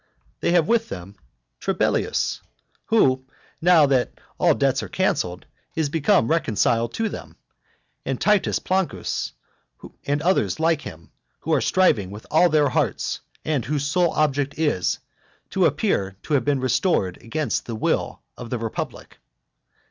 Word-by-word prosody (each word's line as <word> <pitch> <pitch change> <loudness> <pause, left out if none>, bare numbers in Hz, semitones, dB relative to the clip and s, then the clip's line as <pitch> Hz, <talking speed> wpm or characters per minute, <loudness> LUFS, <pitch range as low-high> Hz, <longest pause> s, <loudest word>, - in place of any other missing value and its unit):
They 170 - +1
have 170 -3 +4
with 230 -1 +2
them 95 +2 -8 0.4
Trebellius, - - 0 0.4
who, 130 -13 +3 0.4
now 170 -3 +6
that 130 -3 +1 0.3
all - - +4
debts - - +1
are - - -7
cancelled, 90 +1 -1 0.3
is 160 -3 0
become 160 - +2
reconciled 115 -6 +1
to 225 - 0
them, - - -8 0.7
and - - -3
Titus 210 -2 +2
Plancus, 190 -1 -2 0.7
and 145 +1 0
other 185 +3 +2
like 160 -1 +1
them, 80 0 -10 0.3
who - - -1
are - - +3
striving 120 - +2
with 105 +2 -10
all 175 +3 +5
their 150 -3 +3
hearts, - - -1 0.3
and 150 -6 0
whose 145 +1 -2
sole 175 +4 +2
object 145 -2 0
is, 145 - +1 0.5
to - - +3
appear 95 0 -1
to 155 - -3
have 135 -4 +2
been 140 -2 +1
restored 125 - +1
against 145 +1 -2
the 115 - -4
will 110 - -1
of 120 - -8
the 125 - -1
republic. 115 -1 -6
145 Hz, 145 wpm, -23 LUFS, 115-165 Hz, 0.7 s, now